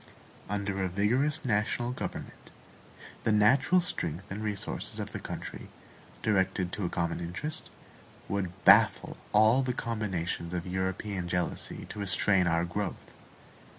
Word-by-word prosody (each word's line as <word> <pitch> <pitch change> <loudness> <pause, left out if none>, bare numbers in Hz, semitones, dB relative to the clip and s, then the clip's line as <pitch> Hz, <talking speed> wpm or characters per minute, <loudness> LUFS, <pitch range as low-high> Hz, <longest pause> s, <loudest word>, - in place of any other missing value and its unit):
Under 100 -1 -2
a 95 - 0
vigorous 125 - +1
national 115 +2 0
government, 125 - -6 0.7
the - - +2
natural 130 +11 +5
strength 90 - -3
and 105 +3 -4
resources 105 -2 -3
of - - -4
the - - -5
country, - - -7 0.6
directed 95 -3 +1
to 100 - -2
a - - -1
common 85 -1 -1
interest, 90 - -5 0.6
would 95 -3 -1
baffle - - +6 0.2
all 110 +5 +5
the 130 -1 -1
combinations 95 -7 -3
of 85 - -3
European 95 +1 -2
jealousy 90 0 -2
to 105 - -7
restrain 95 -2 +3
our 85 0 +2
growth. 95 +2 -4
100 Hz, 130 wpm, -30 LUFS, 90-110 Hz, 0.7 s, baffle